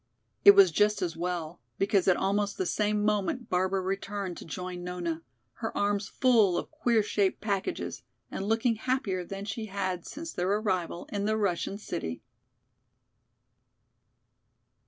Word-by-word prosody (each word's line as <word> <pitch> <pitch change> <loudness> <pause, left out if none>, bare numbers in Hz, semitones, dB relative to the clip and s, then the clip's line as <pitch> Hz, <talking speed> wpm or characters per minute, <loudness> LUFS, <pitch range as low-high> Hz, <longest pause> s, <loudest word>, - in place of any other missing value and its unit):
It 405 0 +10
was 395 -2 +7
just 210 -1 +2
as 170 -2 -2
well, 170 -2 -3 0.2
because 195 -1 +2
at 185 - +5
almost 200 +1 0
the 185 - 0
same 210 +2 +1
moment 215 +5 0
Barbara 190 +1 +1
returned 195 0 -3
to - - -9
join 180 +2 -5
Nona, 175 -2 -3 0.4
her 225 - -4
arms 205 0 +1
full 225 -8 +3
of - - -4
queer 240 -8 +2
shaped 200 -2 +1
packages, 200 -3 -2 0.3
and 195 - -4
looking 225 +1 +2
happier 220 -7 -1
than 195 +3 -6
she 220 +2 -4
had 185 -3 -3
since 325 +2 -7
their 180 +1 -1
arrival 185 -5 -1
in 200 0 -1
the 215 +1 +1
Russian 195 -1 -1
city. 85 - -5
200 Hz, 145 wpm, -29 LUFS, 180-215 Hz, 0.4 s, It